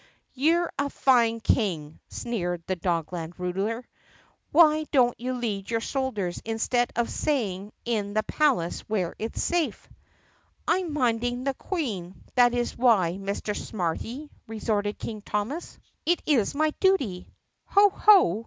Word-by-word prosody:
"You're 330 +6 +2
a 280 0 +1
fine 235 -5 +3
king!" 160 -11 0
sneered 175 -7 -3
the 185 - -1
Dogland 170 -1 -3
ruler. 195 +7 -2 0.7
"Why 310 -1 +5
don't 245 -3 +4
you 255 +2 -2
lead 210 -5 -3
your 230 -1 +1
soldiers 225 -9 -2
instead 230 +2 0
of 235 0 +1
staying 205 -9 -1
in 210 -3 -1
the 215 - +2
palace 245 - +1
where 190 -6 -1
it's 225 +1 -3
safe?" 345 -2 -1 0.8
"I'm 365 -3 +1
minding 245 -3 0
the 275 0 0
Queen, 215 - -4 0.2
that's 245 -1 +3
why, 195 -8 +3
Mr. 200 +1 -3
Smarty!" 225 - -4 0.2
re 220 0 -6
torted 205 -1 -1
King 215 -2 -6
Thomas. 215 +12 -3 0.3
"It 345 +2 +1
is 265 -6 +2
my 310 +1 +2
duty." 275 - +1 0.4
"Ho! 405 0 +5
ho!" 375 - +5
230 Hz, 135 wpm, -26 LUFS, 195-275 Hz, 0.8 s, Why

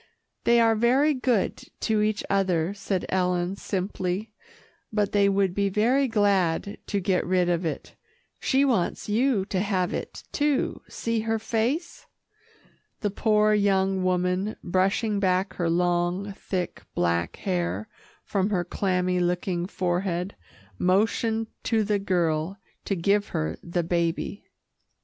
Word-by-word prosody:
"They 235 0 +5
are 225 -1 +5
very 255 +7 +3
good 250 -6 +1 0.2
to 220 -2 +1
each 210 0 0
other," 185 -3 +1
said 195 -2 -2
Ellen 180 0 0
simply, 190 +1 -3 0.6
"but 210 -2 0
they 200 -1 +4
would 195 -2 +2
be 200 +1 +1
very 245 +8 +2
glad 200 -4 +1
to 200 - 0
get 185 0 +1
rid 180 0 +2
of 175 0 0
it. 160 - -4 0.4
She 275 +1 +2
wants 230 -10 0
you 220 -1 +2
to 195 -2 -2
have 185 -3 0
it, - - -5
too. 290 -2 0
See 230 -1 -2
her 225 +1 0
face." 235 +9 -2 0.9
The 205 -3 0
poor 215 0 +3
young 195 -2 +2
woman, 180 +3 0
brushing 195 +4 +1
back 190 0 +1
her 175 -2 0
long, 175 +3 0
thick, 185 -2 -4
black 85 -1 0
hair 180 +3 -2 0.4
from 195 0 0
her 185 -4 +1
clammy 180 -1 0
looking 175 0 0
forehead, 180 0 -1 0.4
motioned 220 +4 +2 0.2
to 225 -2 +2
the 205 0 +1
girl 175 -2 0 0.3
to 195 - 0
give 200 +4 +2
her 80 +1 -2
the 175 0 -2
baby. 170 +3 -1
195 Hz, 135 wpm, -26 LUFS, 180-215 Hz, 0.9 s, They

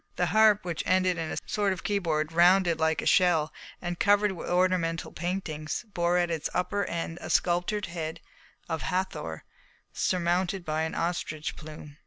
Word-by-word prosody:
The 180 - +1
harp, 215 -2 +5
which 170 -3 -2
ended 185 -1 +2
in 160 -1 -3
a - - -4
sort 205 -2 0
of 185 - -4
keyboard, 165 -7 0
rounded 175 0 +4
like 160 0 +1
a - - -6
shell 175 -5 +3 0.3
and 175 -1 -4
covered 205 0 +4
with 180 - -6
ornamental 175 -2 +1
paintings, 170 0 -4
bore 175 0 +2
at 175 -1 +1
its 160 -2 -2
upper 200 +2 0
end 165 0 -4
a - - -6
sculptured 180 +4 +1
head 165 -1 -5 0.5
of 160 -3 -3
Hathor 185 +7 -3 0.5
surmounted 180 +1 0
by 155 0 -1
an 160 0 -2
ostrich 165 -3 -2
plume. 150 -1 -11
175 Hz, 165 wpm, -28 LUFS, 160-185 Hz, 0.5 s, harp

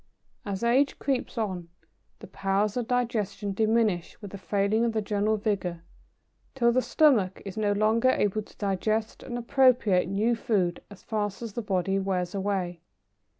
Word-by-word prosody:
"As 195 +1 -3
age 260 +4 +3
creeps 265 -3 -2
on, 185 -6 -3 0.5
the - - -11
powers 195 +2 -1
of 245 -2 -2
digestion 210 -5 -1
diminish 215 -4 +1
with 205 -3 -9
the 200 - -7
failing 200 +3 +1
of 235 -1 +1
the 220 - 0
general 210 +1 0
vigour, 190 -5 -2 0.7
till 235 -3 +3
the 255 +2 +2
stomach 245 -12 +3
is 195 - -6
no 210 -2 +1
longer 220 +4 +3
able 210 -3 +1
to 210 - -17
digest 215 +2 -1
and 245 - -5
appropriate 240 -7 +3
new 215 +5 +1
food 190 -6 0
as 205 - -14
fast 210 0 -3
as 225 -3 -6
the 235 - -3
body 195 -1 0
wears 185 -2 -2
away. 190 -4 -2
210 Hz, 160 wpm, -27 LUFS, 195-230 Hz, 0.7 s, age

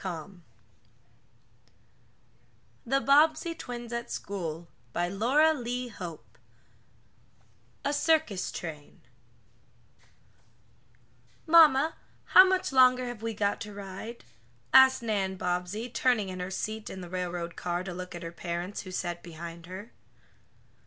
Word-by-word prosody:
209 180 0 -6 2.5
THE 270 +3 +2
BOBBSEY 310 +4 +4
TWINS 240 -5 -7
AT 235 0 -4
SCHOOL 170 -4 -5 0.3
CHAPTER 195 +6 -1 0.2
I 245 - -2 1.7
A 285 - +1
CIRCUS 305 - +1
TRAIN 155 -4 -8 2.4
"MAMMA, 315 -2 +6 0.3
how 370 - +8
much 375 -3 0
longer 255 -1 +5
have 240 -3 -6
we 225 -1 -3
got 205 -1 0
to 210 -2 -7
ride?" 200 +4 -8 0.5
asked 265 -2 +7
Nan 200 -4 -1
Bobbsey, 180 +5 -2
turning 240 -5 +1
in 185 0 -6
her 180 +1 -4
seat 215 +3 -4
in 190 - -7
the 175 - -7
railroad 175 -1 -4
car, 175 0 -2
to 185 -1 -6
look 180 0 -7
at 175 - -7
her 165 - -5
parents, 175 +3 -4
who 185 - -10
sat 175 -1 -3
behind 170 0 -9
her. 190 +6 -9
200 Hz, 115 wpm, -29 LUFS, 175-250 Hz, 2.5 s, how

